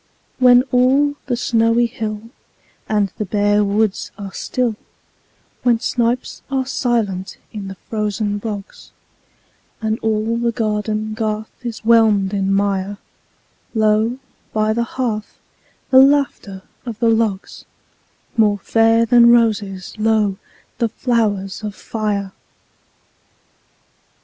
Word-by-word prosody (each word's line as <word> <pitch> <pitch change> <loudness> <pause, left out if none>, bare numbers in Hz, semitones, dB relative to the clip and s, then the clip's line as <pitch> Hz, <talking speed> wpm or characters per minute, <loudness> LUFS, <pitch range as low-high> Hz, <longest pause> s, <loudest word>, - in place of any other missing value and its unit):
When 250 -1 +6
all 265 +4 +3
the 245 -2 0
snowy 230 0 +2
hill 220 -3 -4 0.7
And 205 -3 +1
the 210 - -1
bare 205 +1 +2
woods 205 0 0
are 200 -2 -7
still; 245 -3 -1 0.9
When 240 -2 +3
snipes 240 +1 -1
are 265 -1 0
silent 225 -8 -1 0.2
in 205 -3 -6
the 195 - -7
frozen 210 -1 -2
bogs, 205 -2 -7 0.9
And 220 0 -1
all 220 +1 0
the 235 0 0
garden 215 -1 -2
garth 215 -1 -3
is 235 -3 -6
whelmed 215 -4 +4
in 195 -1 0
mire, 200 0 0 0.8
Lo, 220 +2 +2 0.4
by 215 0 +1
the 235 +1 0
hearth, 220 -5 -2 0.5
the 260 0 +8
laughter 270 -9 +1 0.2
of 235 -4 -6
the 230 0 +1
logs— 220 -4 -1 0.7
More 210 -3 +3
fair 225 +2 +3
than 235 0 +6
roses, 215 -5 +1
lo, 215 -3 +2 0.4
the 230 -2 +1
flowers 215 -5 -1
of 210 -1 -5
fire! 205 -3 -3
220 Hz, 115 wpm, -19 LUFS, 205-235 Hz, 0.9 s, the